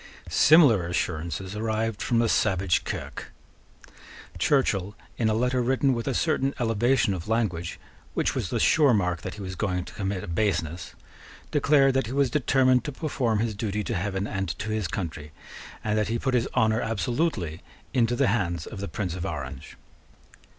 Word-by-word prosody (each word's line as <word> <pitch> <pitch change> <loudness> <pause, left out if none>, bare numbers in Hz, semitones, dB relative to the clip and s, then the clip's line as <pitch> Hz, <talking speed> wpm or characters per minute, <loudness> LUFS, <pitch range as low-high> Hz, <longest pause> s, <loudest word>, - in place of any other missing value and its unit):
Similar 140 - +6
assurances 85 +2 -3
arrived 110 0 -2
from 120 - +1
the 115 0 +3
savage 95 -5 +2
Kirke. - - -5 1.1
Churchill, 105 -8 +1 0.2
in 110 -2 +2
a 110 - +1
letter 125 +2 +1
written 130 +2 +2
with 115 +1 -3
a 135 - 0
certain 140 -4 +1
elevation 120 -1 +2
of 90 -1 -6
language, 105 -7 -1 0.4
which - - +1
was - - -2
the - - -1
sure 145 -7 +4
mark 90 -4 0
that - - -6
he 105 - -8
was 95 -1 -5
going 90 -3 -2
to - - -11
commit 95 -2 -3
a - - -7
baseness, 85 -3 -1 0.6
declared 140 -2 +4
that 135 -3 0
he 125 - -5
was 140 -2 +2
determined 130 -3 +3
to 150 - -3
perform 130 -6 -1
his 115 -1 -1
duty 105 0 -2
to 115 - -3
heaven 95 0 -2
and 95 -3 -3
to 110 +1 -4
his 110 -4 -1
country, 80 -4 -5 0.5
and 105 0 +1
that 105 - 0
he 115 - -1
put 130 +2 -1
his 125 0 +2
honour 110 -1 +3
absolutely 115 - -1 0.3
into 120 -1 +2
the 140 - +2
hands 85 -6 -1
of 105 - -8
the 100 - -4
Prince 95 -5 -3
of 90 -1 -5
Orange. 65 0 -6
110 Hz, 180 wpm, -26 LUFS, 95-125 Hz, 1.1 s, Similar